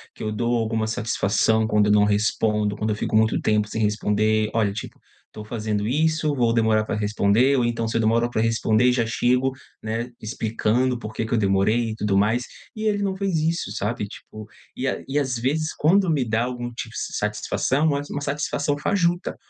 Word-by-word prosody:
que -, -, -8 dB
eu 110 Hz, -, -2 dB
dou 120 Hz, +3 st, 0 dB
alguma 110 Hz, -1 st, -1 dB
satisfação 110 Hz, -1 st, +1 dB
quando 105 Hz, -1 st, +2 dB
eu -, -, +3 dB
não 105 Hz, 0 st, +5 dB
respondo, 105 Hz, 0 st, +1 dB
quando 110 Hz, +1 st, -2 dB
eu -, -, 0 dB
fico 105 Hz, -, -2 dB
muito 110 Hz, 0 st, +3 dB
tempo 105 Hz, -1 st, +1 dB
sem 110 Hz, -, -3 dB
responder. 105 Hz, 0 st, +1 dB
"Olha, 110 Hz, -3 st, +1 dB
tipo, 100 Hz, -, -8 dB, 0.3 s
estou 105 Hz, -, -10 dB
fazendo 105 Hz, -2 st, -3 dB
isso, 155 Hz, +4 st, +1 dB
vou 120 Hz, -4 st, +1 dB
demorar 110 Hz, -2 st, +2 dB
para 110 Hz, -, -2 dB
responder." 105 Hz, +5 st, +2 dB
Ou 125 Hz, -, +2 dB
então 115 Hz, -1 st, -1 dB
se 115 Hz, -, -1 dB
eu -, -, +2 dB
demora 115 Hz, +2 st, +2 dB
para 110 Hz, -, -1 dB
responder 115 Hz, +1 st, +2 dB
já 120 Hz, -2 st, +1 dB
chego, 125 Hz, +3 st, +1 dB, 0.3 s
né, 115 Hz, +3 st, -3 dB
explicando 115 Hz, +2 st, 0 dB
por 110 Hz, -2 st, -7 dB
que 110 Hz, -, -2 dB
que 115 Hz, -, -4 dB
eu -, -, +3 dB
demorei 105 Hz, +3 st, +2 dB
e 110 Hz, -, -4 dB
tudo 105 Hz, -2 st, -1 dB
mais, 110 Hz, +5 st, +2 dB, 0.3 s
e 215 Hz, -, -6 dB
ele 205 Hz, -1 st, +1 dB
não 195 Hz, -1 st, -1 dB
fez 195 Hz, -2 st, -1 dB
isso, 160 Hz, -8 st, -1 dB
sabe 105 Hz, 0 st, -2 dB
tipo 110 Hz, +1 st, -11 dB, 0.3 s
e 130 Hz, -, -2 dB
a -, -, -2 dB
e 145 Hz, +2 st, +1 dB
às 130 Hz, -3 st, -1 dB
vezes, 150 Hz, +7 st, -1 dB
quando 185 Hz, +4 st, +3 dB
me 150 Hz, -5 st, +2 dB
dá 115 Hz, 0 st, 0 dB
algum 120 Hz, -1 st, -5 dB
tipo 120 Hz, -, -7 dB
se -, -, -4 dB
satisfação, 140 Hz, +4 st, 0 dB
mas 145 Hz, 0 st, -2 dB
uma 145 Hz, -, -4 dB
satisfação 145 Hz, 0 st, -1 dB
fajuta. 175 Hz, +2 st, 0 dB
115 Hz, 205 wpm, -23 LUFS, 110-130 Hz, 0.3 s, não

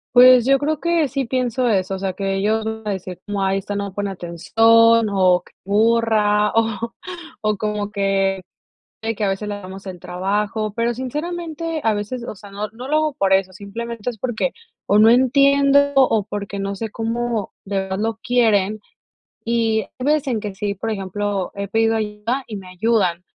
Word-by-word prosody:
Pues 250 Hz, -1 st, +8 dB
yo 275 Hz, 0 st, +4 dB
creo 305 Hz, +1 st, -1 dB
que 340 Hz, -3 st, +1 dB
sí 270 Hz, +1 st, -2 dB
pienso 250 Hz, 0 st, 0 dB
eso, 195 Hz, -3 st, +1 dB
o -, -, -6 dB
sea, 190 Hz, -1 st, -2 dB
que 195 Hz, 0 st, -2 dB
ellos 215 Hz, +3 st, +1 dB
van 220 Hz, 0 st, -4 dB
a -, -, 0 dB
decir, 185 Hz, -2 st, -6 dB
como 205 Hz, -1 st, -3 dB
ay 195 Hz, 0 st, +1 dB
esta 205 Hz, +1 st, -4 dB
no 200 Hz, -1 st, -3 dB
pone 205 Hz, -1 st, -2 dB
atención 225 Hz, +6 st, +4 dB
o 185 Hz, -3 st, +3 dB
c -, -, -22 dB
burra, 210 Hz, -1 st, +3 dB
o 225 Hz, 0 st, 0 dB, 0.5 s
o 215 Hz, -1 st, 0 dB
como 210 Hz, -1 st, -2 dB
que 195 Hz, -2 st, 0 dB, 0.6 s
eh, 225 Hz, 0 st, -1 dB
que 215 Hz, -, -3 dB
a 195 Hz, -, +1 dB
veces 195 Hz, +2 st, -3 dB
le 205 Hz, -, -3 dB
hagamos 195 Hz, 0 st, -9 dB
el 185 Hz, -2 st, -7 dB
trabajo. 205 Hz, +4 st, -2 dB
Pero 235 Hz, +1 st, 0 dB
sinceramente, 320 Hz, +4 st, -4 dB
a 220 Hz, -1 st, +3 dB
veces, 215 Hz, +4 st, -4 dB
o -, -, -4 dB
sea, 200 Hz, 0 st, -13 dB
no 205 Hz, +2 st, -4 dB
no 245 Hz, +5 st, -9 dB
lo 305 Hz, -, +1 dB
hago 310 Hz, -2 st, +1 dB
por 195 Hz, -8 st, 0 dB
eso, 190 Hz, -1 st, +2 dB
simplemente 225 Hz, +4 st, -5 dB
es 230 Hz, -, -7 dB
porque 250 Hz, -, -2 dB, 0.3 s
o 200 Hz, -, +4 dB
no 220 Hz, +2 st, +7 dB
entiendo 280 Hz, +2 st, +4 dB
o 225 Hz, -6 st, +4 dB
porque 200 Hz, -1 st, -5 dB
no 195 Hz, 0 st, -2 dB
sé 220 Hz, +2 st, -5 dB
cómo 230 Hz, -1 st, -2 dB
de 195 Hz, 0 st, -3 dB
verdad 190 Hz, +1 st, -4 dB
lo 225 Hz, 0 st, -1 dB
quieren, 215 Hz, -5 st, +2 dB, 0.7 s
y 225 Hz, -1 st, +1 dB, 0.2 s
hay 250 Hz, -, -3 dB
veces 300 Hz, -1 st, +2 dB
en 235 Hz, -4 st, 0 dB
que 205 Hz, -2 st, -6 dB
sí, 205 Hz, +1 st, -2 dB
por 225 Hz, +3 st, -5 dB
ejemplo, 200 Hz, -1 st, -2 dB
he 200 Hz, 0 st, -4 dB
pedido 225 Hz, +2 st, +2 dB
ayuda 215 Hz, +5 st, -2 dB
y 215 Hz, -, -6 dB
me 185 Hz, -1 st, -10 dB
ayudan. 180 Hz, -3 st, +1 dB
215 Hz, 195 wpm, -20 LUFS, 195-235 Hz, 0.7 s, Pues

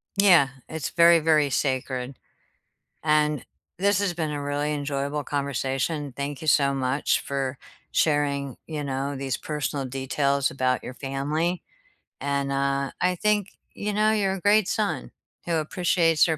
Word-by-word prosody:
Yeah, 185 Hz, -8 st, +6 dB, 0.2 s
it's 160 Hz, -3 st, -3 dB
very, 170 Hz, 0 st, +6 dB
very 155 Hz, -2 st, +3 dB
sacred, 130 Hz, -1 st, -1 dB, 0.9 s
and 150 Hz, -2 st, +2 dB, 0.3 s
this 200 Hz, +1 st, +3 dB
has 195 Hz, -3 st, 0 dB
been 160 Hz, -3 st, -2 dB
a 145 Hz, -, -3 dB
really 145 Hz, +1 st, -1 dB
enjoyable 145 Hz, 0 st, -2 dB
conversation. 140 Hz, +1 st, -2 dB
Thank 140 Hz, 0 st, -4 dB
you 155 Hz, -, -7 dB
so 140 Hz, -1 st, +4 dB
much 130 Hz, +1 st, +1 dB
for 135 Hz, -1 st, -3 dB, 0.3 s
sharing, 140 Hz, -3 st, +1 dB
you 150 Hz, -2 st, -4 dB
know, 135 Hz, +1 st, -2 dB
these 135 Hz, -2 st, -2 dB
personal 150 Hz, -2 st, -3 dB
details 135 Hz, +1 st, 0 dB
about 130 Hz, -1 st, 0 dB
your 125 Hz, -, -7 dB
family, 150 Hz, +6 st, -2 dB, 0.6 s
and, 140 Hz, -1 st, -1 dB
uh, 140 Hz, 0 st, 0 dB
I 180 Hz, 0 st, +2 dB
think, 210 Hz, +1 st, +1 dB, 0.2 s
you 210 Hz, 0 st, -3 dB
know, 215 Hz, +1 st, +3 dB
you're 200 Hz, -3 st, +1 dB
a 195 Hz, -, -4 dB
great 205 Hz, -1 st, +4 dB
son 210 Hz, -2 st, -1 dB, 0.3 s
who 170 Hz, -1 st, 0 dB
appreciates 165 Hz, 0 st, +2 dB
their 160 Hz, -2 st, 0 dB
145 Hz, 145 wpm, -25 LUFS, 140-170 Hz, 0.9 s, Yeah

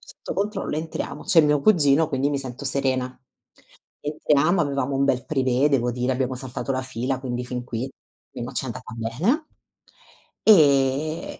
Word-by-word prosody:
sotto -, -, -9 dB
controllo". 200 Hz, -5 st, -2 dB
Entriamo. 155 Hz, -2 st, -5 dB
C'è 170 Hz, -, +6 dB
mio 150 Hz, -1 st, +3 dB
cugino, 155 Hz, -4 st, +4 dB
quindi 140 Hz, -1 st, 0 dB
mi 140 Hz, -, -1 dB
sento 130 Hz, 0 st, -7 dB
serena. 130 Hz, -1 st, -1 dB, 0.8 s
Entriamo, 150 Hz, +3 st, +2 dB
avevamo 140 Hz, -3 st, -1 dB
un 135 Hz, -, +2 dB
bel 125 Hz, -2 st, +1 dB
privé 135 Hz, -2 st, +2 dB
devo 125 Hz, -4 st, +1 dB
dire, 125 Hz, +2 st, -1 dB
abbiamo 130 Hz, 0 st, -1 dB
saltato 130 Hz, +1 st, -6 dB
la 130 Hz, 0 st, -2 dB
fila, 130 Hz, +1 st, -3 dB
quindi 125 Hz, -2 st, -3 dB
fin 125 Hz, 0 st, -5 dB
qui, 125 Hz, +2 st, -4 dB, 0.4 s
almeno -, -, -5 dB
ci -, -, -1 dB
è -, -, -5 dB
andata -, -, -7 dB
bene. 155 Hz, -, 0 dB, 1.0 s
Ehm, 150 Hz, -4 st, +4 dB
135 Hz, 160 wpm, -24 LUFS, 130-150 Hz, 1.0 s, C'è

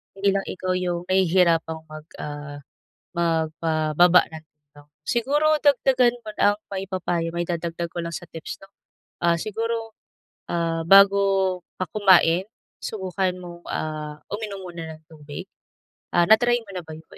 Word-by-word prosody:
hindi 195 Hz, 0 st, +1 dB
lang 195 Hz, -, 0 dB
ikaw 185 Hz, 0 st, -3 dB
yung 180 Hz, -1 st, -2 dB
nahihirapang 170 Hz, -3 st, +2 dB
mag 155 Hz, 0 st, -10 dB
ah, 145 Hz, -1 st, -6 dB, 0.5 s
magpababa 165 Hz, 0 st, +3 dB
ng 160 Hz, -, -7 dB
timbang. 145 Hz, -1 st, -22 dB, 0.2 s
Siguro 295 Hz, +5 st, +2 dB
dagdagan 255 Hz, -4 st, +3 dB
muna 215 Hz, -1 st, -4 dB
ang -, -, -32 dB
maipapayo 185 Hz, -3 st, -2 dB
mai-dadagdag 170 Hz, 0 st, -3 dB
ko 175 Hz, -, -3 dB
lang 170 Hz, 0 st, -5 dB
sa -, -, -8 dB
tips 165 Hz, -, -7 dB
'no, 195 Hz, -, -18 dB, 0.5 s
ah, 170 Hz, -1 st, +3 dB
siguro, 225 Hz, +3 st, -3 dB, 0.6 s
ah, 165 Hz, -1 st, -1 dB
bago 195 Hz, -1 st, +5 dB, 0.2 s
ka 185 Hz, -, -2 dB
kumain 190 Hz, -2 st, +4 dB, 0.3 s
subukan 190 Hz, -2 st, -2 dB
mong, 175 Hz, -1 st, -10 dB
ah, 150 Hz, -1 st, -4 dB
uminom 205 Hz, -2 st, -5 dB
muna 165 Hz, -3 st, -7 dB
ng 155 Hz, -, -24 dB
tubig, 150 Hz, +3 st, -9 dB, 0.7 s
ah, 175 Hz, -, +5 dB
na 220 Hz, -, +9 dB
try 240 Hz, 0 st, +3 dB
mo 200 Hz, -, -14 dB
na 180 Hz, -, -2 dB
ba 160 Hz, -, -10 dB
yun, 160 Hz, -, -14 dB
175 Hz, 145 wpm, -24 LUFS, 160-195 Hz, 0.7 s, na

